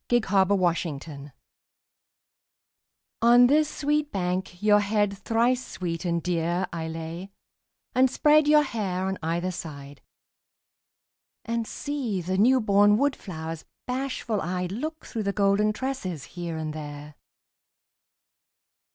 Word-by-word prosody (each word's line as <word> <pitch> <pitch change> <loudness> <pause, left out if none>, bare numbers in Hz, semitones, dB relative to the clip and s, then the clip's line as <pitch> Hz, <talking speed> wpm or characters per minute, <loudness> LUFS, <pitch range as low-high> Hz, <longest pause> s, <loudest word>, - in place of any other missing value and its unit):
YOUTH'S 240 -4 +2
SPRING 185 -6 +2
TRIBUTE 145 -2 -10 1.9
On 240 +1 +7
this 300 +3 +3
sweet 295 0 -1
bank 180 -1 -2
your 210 -1 +6
head 205 -1 +1
thrice 235 +5 +1
sweet 175 -4 -5
and 170 -1 0
dear 175 +1 0
I 165 -1 -3
lay, 165 +3 -6 0.6
and 260 +1 +4
spread 300 +3 +4
your 300 0 +6
hair 195 -8 -2
on 190 0 -2
either 170 +3 -1
side, 145 -5 -8 1.4
And 230 -1 -2
see 270 -9 -3
the 185 +2 -2
newborn 210 -3 +5
wood 280 +2 +2
flowers 160 -3 -7 0.2
bashful 250 -4 -2
eyed 180 +1 -2
Look 310 +9 -5
through 225 - -4
the 200 -1 -1
golden 200 +1 +2
tresses 215 - -4
here 170 -2 -4
and 155 -1 -4
there. 150 -1 -8
195 Hz, 120 wpm, -26 LUFS, 170-240 Hz, 1.9 s, On